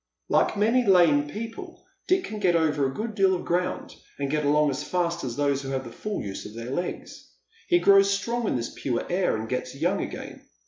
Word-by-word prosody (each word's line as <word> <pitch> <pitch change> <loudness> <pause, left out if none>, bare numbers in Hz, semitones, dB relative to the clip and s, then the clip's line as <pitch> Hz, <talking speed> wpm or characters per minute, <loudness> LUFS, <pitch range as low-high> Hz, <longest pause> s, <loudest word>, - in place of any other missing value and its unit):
Like - - +2
many 230 +5 +3
lame 170 -8 +4
people 230 - -8 0.2
Dick 370 +1 +3
can 215 - -6
get 180 -4 +3
over 150 -4 +2
a - - -3
good 220 +9 -4
deal 195 -2 +3
of 175 - -5
ground, 180 +1 -1 0.2
and 140 -1 -2
get 150 0 0
along 150 0 +3
as 130 - -3
fast 170 -1 -1
as 120 -3 -4
those 140 -1 +1
who 135 - -6
have 135 -1 -2
the 120 - -9
full 210 - -4
use 100 -2 -6
of 105 - -12
their 115 +2 -6
legs. 175 +6 -5 0.4
He 350 - +4
grows 200 - +5
strong 230 +3 -1
in - - 0
this 115 -1 -3
pure 125 -4 -2
air, 180 -6 +1
and 110 +1 -5
gets 125 +2 -3
young 175 +7 0
again. - - -7
170 Hz, 220 wpm, -26 LUFS, 135-200 Hz, 0.4 s, grows